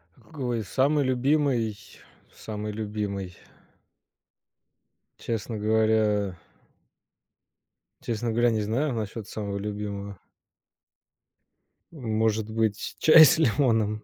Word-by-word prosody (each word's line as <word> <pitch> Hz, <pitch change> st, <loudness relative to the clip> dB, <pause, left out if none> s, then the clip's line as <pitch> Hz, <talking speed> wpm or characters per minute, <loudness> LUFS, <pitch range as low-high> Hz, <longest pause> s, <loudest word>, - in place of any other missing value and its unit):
Какой 125 Hz, -7 st, -4 dB
самый 140 Hz, +8 st, +1 dB
любимый 130 Hz, -4 st, +1 dB, 0.6 s
самый 105 Hz, -1 st, -6 dB
любимый 105 Hz, -4 st, -4 dB, 1.8 s
честно 115 Hz, 0 st, -4 dB
говоря 105 Hz, -2 st, +1 dB, 1.7 s
честно 115 Hz, 0 st, -2 dB
говоря, 120 Hz, +2 st, +3 dB
не 110 Hz, -1 st, 0 dB
знаю, 125 Hz, +7 st, -1 dB
насчет 110 Hz, -1 st, -5 dB
самого 100 Hz, -2 st, -5 dB
любимого. 100 Hz, -1 st, -5 dB, 1.7 s
Может 110 Hz, -6 st, -1 dB
быть, 110 Hz, -1 st, -2 dB
чай 155 Hz, 0 st, +9 dB
с 155 Hz, -, +4 dB
лимоном, 110 Hz, -6 st, +1 dB
110 Hz, 80 wpm, -26 LUFS, 105-120 Hz, 1.8 s, чай